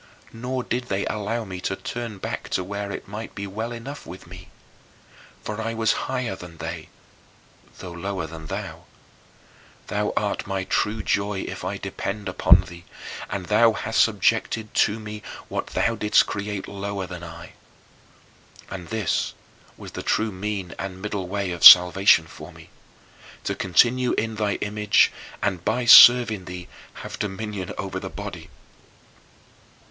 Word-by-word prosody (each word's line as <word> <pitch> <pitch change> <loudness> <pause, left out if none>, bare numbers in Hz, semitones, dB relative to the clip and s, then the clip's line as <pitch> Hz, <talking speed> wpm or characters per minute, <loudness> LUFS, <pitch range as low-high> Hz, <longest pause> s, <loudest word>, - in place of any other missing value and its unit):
Nor 125 +2 -3
did 125 +1 -2
they 100 -4 -2
allow 110 +2 -2
me 95 -2 -7
to 95 - -2
turn 115 0 -6
back - - -5
to 90 - -1
where 100 +1 -5
it - - -7
might 105 +3 -7
be 100 - -5
well 110 +4 -5
enough 125 +5 -7
with 90 +3 -11
me. 90 +1 -12 1.0
For 105 +1 -4
I 115 +1 -3
was 110 -1 +2 0.2
higher 125 -6 -2
than 90 -2 -11
they, - - -6 0.9
though 90 - -8
lower 95 0 -4
than 80 -1 -9
thou. - - -6 1.0
Thou - - -1
art - - -1
my 95 -1 -2
true 105 +3 -1
joy 100 -1 0
if - - -7
I - - -3
depend 100 +1 -5
upon 90 -1 +5
thee, 85 -1 -12 0.5
and 95 -2 -4
thou 110 +4 +4
hadst 115 +1 +1
subjected 110 +1 +1
to 105 +2 +2
me 105 -1 -8 0.3
what - - -3
thou 115 - 0
didst 105 -1 +3
create 100 -1 -4
lower 100 -1 -4
than 90 -1 -8
I. 80 -1 -10 1.2
And 90 -1 -7
this 110 -3 -1 0.4
was - - -10
the - - -6
true 110 0 0
mean 95 -2 -4
and 95 -1 -5
middle 100 -2 -4
way 100 -1 -2
of 85 - -5
salvation 90 -1 +9
for - - -11
me, - - -16 0.7
to - - -1
continue 120 +7 +2
in 110 0 -1
thy 105 -2 -1
image 105 0 +3 0.3
and 95 -4 -1
by 125 +5 0
serving 115 -4 +8
thee 90 -1 -8 0.4
have - - -7
dominion 100 -2 -4
over - - -4
the - - -6
body. - - -8
100 Hz, 155 wpm, -24 LUFS, 95-110 Hz, 1.2 s, salvation